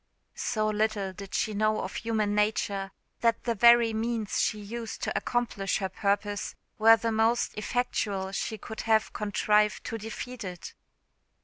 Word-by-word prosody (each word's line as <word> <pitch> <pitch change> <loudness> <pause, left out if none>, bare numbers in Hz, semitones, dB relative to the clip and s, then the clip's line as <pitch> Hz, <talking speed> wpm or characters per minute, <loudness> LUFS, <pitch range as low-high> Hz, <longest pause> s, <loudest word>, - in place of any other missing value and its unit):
So 215 -1 -1
little 210 -2 0
did 200 0 -8
she 215 - 0
know 215 +1 +1
of 190 - -5
human 215 -2 0
nature 205 -2 0 0.3
that 230 -1 +1
the 235 - 0
very 235 +1 +6
means 225 -1 -1
she 215 - 0
used 225 +2 -6
to - - -2
accomplish 230 -5 -1
her 190 -2 -2
purpose 205 +1 -1 0.2
were 225 +1 +8
the 230 +1 -1
most 225 +2 +2
effectual 205 -4 -1
she 220 +2 -3
could 220 +1 -7
have 220 -1 +3
contrived 210 0 +1
to 225 - -4
defeat 235 +2 -6
it. 180 -3 -7
215 Hz, 150 wpm, -28 LUFS, 205-225 Hz, 0.3 s, were